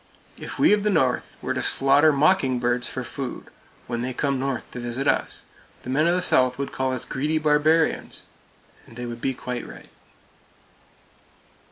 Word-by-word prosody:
If - - -8
we - - +5
of 210 - +2
the 210 - +1
North 135 -10 0
were - - -1
to - - -2
slaughter 140 +3 +4
mockingbirds 130 -6 +2
for 130 - -4
food, 125 +1 -7 0.3
when 120 -1 -3
they 125 0 -3
come 140 -2 0
North 135 -1 -3
to 125 - -6
visit 120 +3 -3
us, - - 0 0.4
the 125 - -5
men 150 +5 +3
of 175 - +3
the 180 - 0
South 130 -6 +3
would 140 0 -4
call 130 0 -1
us 130 -2 -3
greedy 150 +4 -1
barbarians; 155 +1 +2 0.6
and 115 - -15
they 120 0 -5
would 120 0 -7
be 135 +1 -1
quite 125 0 -5
right. - - -12
135 Hz, 175 wpm, -24 LUFS, 125-150 Hz, 0.6 s, we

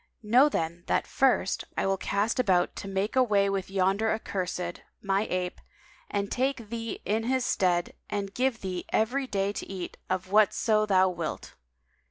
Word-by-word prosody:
Know 250 +7 +5
then 170 - -2
that - - +1
first, 260 -7 +2
I - - +1
will 195 0 +2
cast 200 +5 -1
about 185 -7 +2
to - - -6
make 195 +3 -1
away 205 -6 +3
with 195 -1 -2
yonder 195 +3 +1
accursed, 180 -5 -3 0.2
my 195 +1 0
ape, 180 -1 -2 0.5
and 200 -1 -2
take 255 -4 -1
thee 230 -1 -4
in 220 +2 0
his 260 0 +1
stead 175 -2 +1 0.2
and 200 -1 -3
give 250 -1 0
thee 185 -2 -4
every 260 +5 +1
day 200 -3 0
to - - -6
eat 185 -2 -6
of 185 0 -2
whatso 215 +1 +3
thou 190 -2 +5
wilt." 170 -3 -5
200 Hz, 165 wpm, -28 LUFS, 185-225 Hz, 0.5 s, Know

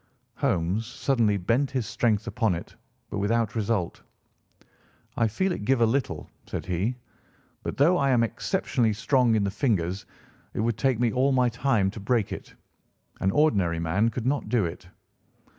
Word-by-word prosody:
Holmes 90 +7 0
suddenly 120 -4 +1
bent 115 +9 +1
his 130 -5 -2
strength 110 -1 0
upon 110 -4 0
it, 85 - -8 0.4
but 100 - -2
without 115 +2 +1
result. 105 -5 -1 1.1
"I 115 - +2
feel 190 - 0
it 140 - -3
give 130 +3 +2
a - - +6
little," 115 - -1 0.2
said - - -4
he; 95 +7 -1 0.7
"but, - - -5
though 165 +6 +4
I 140 - +2
am 120 -3 +4
exceptionally 115 0 0
strong 125 +1 +2
in 105 - +2
the 100 - 0
fingers, 95 - -1 0.5
it - - -2
would 115 0 -1
take 130 -4 +2
me 120 -2 +2
all 135 +2 +2
my 125 -1 +3
time 115 -5 +1
to 110 - -8
break 105 +1 0
it. - - -9 0.6
An 95 - +1
ordinary 95 - +2
man 85 +7 +1
could 115 +1 -5
not 140 +1 0
do 115 -6 +2
it. 85 +1 -7
115 Hz, 170 wpm, -26 LUFS, 100-125 Hz, 1.1 s, a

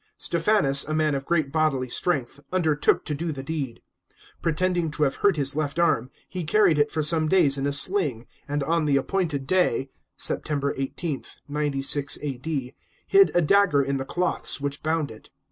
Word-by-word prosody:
Stephanus, 165 -6 +3
a 155 - -2
man 155 -1 +1
of 135 0 -4
great 155 -5 0
bodily 150 -4 0
strength, 140 0 -1
undertook 160 -5 +1
to 150 - -3
do 160 +3 -3
the 135 -3 -7
deed. 140 -5 -5 0.6
Pretending 175 +1 0
to 150 0 -2
have 135 -2 0
hurt 200 -5 +2
his 140 -1 0
left 150 -1 -2
arm, 130 -8 +1 0.2
he 185 -2 -5
carried 170 -2 +3
it 145 - +2
for 155 -1 -2
some 155 0 +4
days 165 -7 +4
in 140 0 -1
a - - 0
sling, 145 - +1 0.2
and 145 0 -2
on 165 +2 0
the 140 -2 +2
appointed 155 -2 -2
day 140 -6 0 0.3
(September 140 -2 -2
18, 135 +2 -4 0.3
96 145 -1 +1
A.D.) 140 -1 -4 0.3
hid 395 0 +5
a 175 - +3
dagger 170 -4 +3
in 135 0 -2
the 135 - -3
cloths 180 +3 0
which 140 0 -4
bound 155 -4 -1
it. 110 - -14
150 Hz, 180 wpm, -24 LUFS, 140-170 Hz, 0.6 s, hid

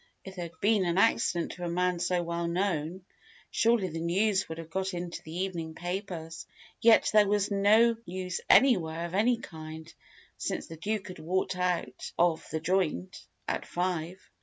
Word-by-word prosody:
If 190 -1 -9
there 175 -2 -4
had 165 - -12
been 210 -1 +3
an 170 +1 0
accident 195 -5 +2
to 180 - -8
a 175 - -2
man 180 0 0
so 180 0 0
well 170 0 -2
known, 175 -1 -1 0.5
surely 225 -4 +3
the 165 -1 -5
news 190 +4 +1
would 160 - -5
have 165 -1 -9
got 190 +1 -2
into 175 0 -5
the 165 +3 -5
evening 165 -4 -4
papers. 175 -3 -5 0.3
Yet 230 0 +6
there 210 -1 +6
was 205 0 +1
no 215 +4 +5
news 180 0 -4
anywhere 170 -11 +4
of 170 - -7
any 230 +5 +3
kind, 160 -5 -9 0.5
since - - -2
the 165 - -9
Duke 205 +4 -3
had 185 - -9
walked 185 +3 -1
out 180 -1 -2
of 170 -2 +2
"The 160 - -2
Joint" 160 - -1 0.2
at - - -1
five. 180 0 -2
180 Hz, 175 wpm, -29 LUFS, 170-195 Hz, 0.5 s, Yet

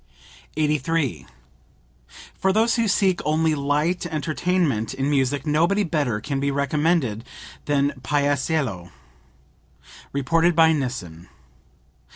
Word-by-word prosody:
83. 150 -1 0 1.1
"For 190 - 0
those 225 +4 +2
who 230 -2 +1
seek 190 -2 +2
only 155 +1 +1
light 150 +5 0
entertainment 155 -5 -1
in 135 +1 -1
music 140 0 0
nobody 170 +7 +2
better 145 - -1
can 140 +3 -3
be 140 +1 0
recommended 140 -4 0 0.4
than 145 -1 +1
Paisiello." 140 - -1 1.2
(Reported 165 +5 +1
by 160 -1 +5
Nissen. 105 - -5
150 Hz, 100 wpm, -23 LUFS, 135-165 Hz, 1.2 s, by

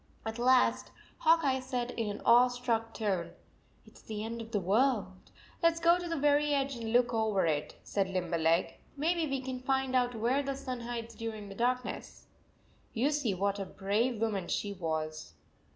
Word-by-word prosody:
At 220 +1 -4
last 115 - +3 0.3
Hawk 330 +1 +5
Eye 265 -2 +2
said 250 -2 -3
in 225 -3 -2
an 205 - -6
awestruck 240 -1 +3
tone, 195 -7 -2 0.5
"It - - -18
s - - -17
the 215 -1 -5
end 230 +1 -5
of 225 - -9
the 215 -3 0
world/ 200 -1 0
" - - -26
Let 335 -1 +5
s 330 - -7
go 340 +1 +4
to 350 - -5
the 330 - -1
very 290 +1 +3
edge 275 -1 0
and 230 -2 -4
look 240 0 +3
over 220 -4 +1
it," 150 -2 -1
said 195 -2 -1
Limberleg. 170 -2 0
" - - -30
Maybe 325 +2 +1
we 270 -1 -1
can 260 -1 -5
find 265 0 0
out 245 -1 +2
where 240 +5 +1
the 275 -1 -3
sun 255 -2 -5
hides 235 -1 -5
during 220 -3 -6
the - - -7
dark 250 +4 0
ness." - - -8 0.7
You 260 +6 +2
see 275 -10 0
what 200 +2 0
a - - -1
brave 210 +6 -1
woman 210 -5 -1
she 205 -1 -2
was. 155 - -4
235 Hz, 200 wpm, -31 LUFS, 200-265 Hz, 0.7 s, Hawk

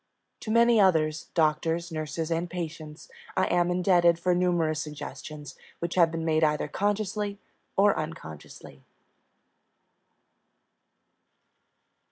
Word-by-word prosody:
To - - -8
many 235 0 +4
others 160 -5 +2
doctors, 165 +1 +1
nurses, 155 +1 -4
and 165 +1 -1
patients 160 -2 -7 0.3
I 185 - +3
am 175 0 +2
indebted 175 -1 +3
for 180 +1 +1
numerous 175 -4 +1
suggestions 150 -1 -8 0.2
which 170 0 -4
have 170 -3 +4
been 165 0 -4
made 160 0 +2
either 150 -1 +1
consciously 205 +3 -2 0.4
or 200 +1 +5
unconsciously. 80 - -8
165 Hz, 105 wpm, -27 LUFS, 155-180 Hz, 0.4 s, or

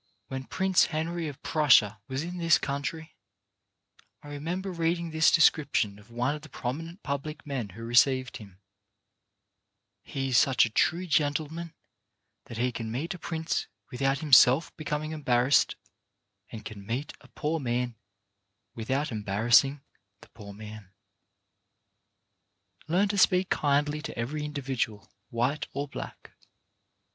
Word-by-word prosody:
When 130 0 -5
Prince 190 +3 +2
Henry 165 +1 -3
of 145 -3 -9
Prussia 120 -9 +4
was 135 +3 -3
in 175 +1 -6
this 165 -1 +5
country, 145 +3 -4 1.1
I 145 - -10
remember 170 +7 -4
reading 170 0 -1
this 160 0 +4
descripion 140 -10 +3
of 105 - -19
one 120 +4 -1
of 150 - -7
the 155 - -13
prominent 165 - -5
public 150 +2 -4
men 130 -7 -3
who 115 - -8
received 130 +1 +3
him: 100 -4 -14 1.4
"He 135 -1 -4
is 125 - +5
such 135 -3 +4
a 110 - -5
true 170 +10 +1
gentleman 155 +1 -1 0.7
that 115 - -9
he 125 +2 +1
can 115 -2 -5
meet 155 +10 -3
a 180 - -10
prince 160 +1 -2 0.2
without 135 +2 0
himself 140 0 +5
being 155 0 -3
embarrassed, 130 -3 +2 0.8
and 110 -2 -8
can 100 -2 -8
meet 125 +8 -4
a - - -17
poor 160 +2 -2
man 125 -2 -1 0.8
without 130 +6 -2
embarrassing 115 +7 +3 0.4
the - - -16
poor 105 -3 -11
man. 105 -1 -10 1.0
" - - -37
Learn 180 +6 +2
to 200 0 0
speak 185 0 +3
kindly 145 +1 +1
to - - -7
every 145 +6 -3
individual, 135 -8 -3 0.2
white 125 +6 -1
or 140 +1 -3
black. - - -9
140 Hz, 135 wpm, -28 LUFS, 120-160 Hz, 1.4 s, this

